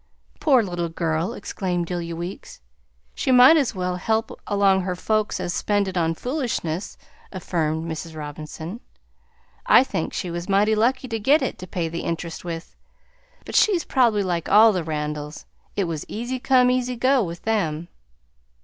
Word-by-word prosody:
"Poor 265 -6 +4
little 175 -3 -3
girl!" 165 +1 -1
exclaimed 180 -3 -3
Delia 170 -1 -4
Weeks. 175 +3 -7 0.5
"She - - -1
might 255 +5 +8
as 280 -9 +1
well 180 -1 -2
help 220 +4 0 0.2
along 195 -2 +3
her 180 0 -2
folks 215 +2 -1
as 175 -1 -2
spend 205 -1 0
it 190 - -5
on 165 -2 +1
foolishness," 225 - -3 0.3
affirmed 160 -4 -2
Mrs. 160 0 -6
Robinson. 155 +6 -7 0.9
"I - - +7
think 210 -11 -3
she 180 - -4
was 170 +2 -5
mighty 205 +2 +3
lucky 250 +5 +1
to 225 -2 -3
git 275 +7 +3
it 260 - -3
to 185 - -8
pay 175 -3 -2
the 165 +1 -4
interest 165 0 -4
with, 170 -1 -6 0.7
but - - -8
she's 370 -6 +4
probably 230 -6 +2
like 175 -3 -2
all 220 +1 +7
the 180 -3 -1
Randalls; 150 -1 -4 0.3
it 200 - +1
was 165 -4 -3
easy 240 +4 -4
come, 250 -1 +4
easy 250 0 0
go, 255 +2 +3
with 170 -2 -6
them." 170 -7 -1
185 Hz, 165 wpm, -23 LUFS, 165-230 Hz, 0.9 s, might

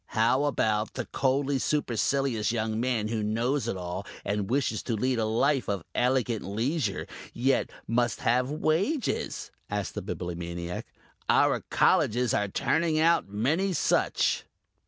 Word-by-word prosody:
"How 120 +5 +3
about 110 -6 0
the - - -3
coldly 135 +1 0
supercilious 135 -4 0
young 110 -1 -1
man 115 -3 0
who 110 -1 -1
knows 115 +5 0
it 115 - -2
all 90 +1 -4 0.2
and 100 -1 -1
wishes 125 -5 0
to 115 - -2
lead 125 +3 0
a 110 - +1
life 125 +4 +1
of 100 -4 -1
elegant 125 -3 +1
leisure, 110 - -1 0.3
yet 130 +3 +1 0.2
must 120 0 +1
have 125 +2 +2
wages?" 165 - -1 0.2
asked 105 -2 -2
the - - -4
Bibliomaniac. 85 0 -5 0.4
"Our - - +4
Colleges 120 +2 +3
are 105 - +1
turning 160 - +1
out 165 -8 +3
many 150 - +1
such." 155 - +1
120 Hz, 135 wpm, -28 LUFS, 105-135 Hz, 0.4 s, Our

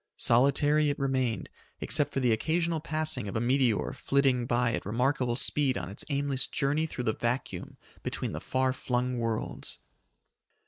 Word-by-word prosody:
Solitary 145 +5 +4
it 145 - -1
remained, 130 -6 -1 0.3
except 150 -2 +1
for 135 - -1
the 125 -2 +3
occasional 165 +7 0
passing 155 -6 -1
of 100 - -5
a - - +1
meteor 125 -2 +1
flitting 135 -3 +1
by 120 -1 +1
at - - -2
a - - -6
remarkable 125 +1 +1
speed 135 0 +1
on - - -5
its 100 - -2
aimless 140 -2 0
journey 145 +4 0
through 125 - -5
the 110 - +1
vacuum 120 +4 -3 0.2
between - - -3
the - - -5
far 130 0 0
flung 125 -1 -1
worlds. 115 -2 -3
130 Hz, 165 wpm, -29 LUFS, 120-145 Hz, 0.3 s, Solitary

